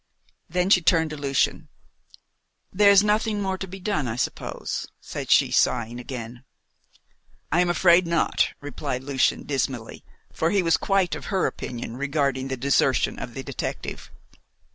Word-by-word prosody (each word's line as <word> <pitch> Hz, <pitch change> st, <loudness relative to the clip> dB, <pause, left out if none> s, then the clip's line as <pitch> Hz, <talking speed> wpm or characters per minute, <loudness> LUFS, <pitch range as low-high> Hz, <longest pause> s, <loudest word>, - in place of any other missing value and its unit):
Then 180 Hz, +3 st, 0 dB
she 180 Hz, -, +6 dB
turned 160 Hz, -2 st, +2 dB
to -, -, -4 dB
Lucian. 140 Hz, -2 st, -1 dB, 1.0 s
"There 200 Hz, +2 st, +5 dB
is 200 Hz, 0 st, +7 dB
nothing 210 Hz, 0 st, +1 dB
more 190 Hz, -1 st, -2 dB
to 190 Hz, -, -5 dB
be 190 Hz, +2 st, -9 dB
done, 180 Hz, -8 st, -1 dB
I 110 Hz, -, -3 dB
suppose," 125 Hz, -, -3 dB
said -, -, -7 dB
she, -, -, +4 dB
sighing 120 Hz, 0 st, +1 dB
again. 125 Hz, -1 st, -7 dB, 1.1 s
"I 170 Hz, +4 st, +3 dB
am 180 Hz, -, +1 dB
afraid 175 Hz, 0 st, +4 dB
not," 170 Hz, -1 st, +1 dB
replied 130 Hz, -2 st, -4 dB
Lucian 135 Hz, -1 st, +1 dB
dismally, 135 Hz, -4 st, -3 dB, 0.3 s
for 160 Hz, -, 0 dB
he 195 Hz, 0 st, +2 dB
was 165 Hz, -1 st, +3 dB
quite 195 Hz, -3 st, +1 dB
of -, -, -6 dB
her 190 Hz, -2 st, 0 dB
opinion 120 Hz, -1 st, -5 dB
regarding 140 Hz, -2 st, -1 dB
the 130 Hz, -1 st, -3 dB
desertion 140 Hz, +3 st, +1 dB
of -, -, -7 dB
the -, -, -5 dB
detective. -, -, -5 dB
155 Hz, 155 wpm, -24 LUFS, 130-185 Hz, 1.1 s, is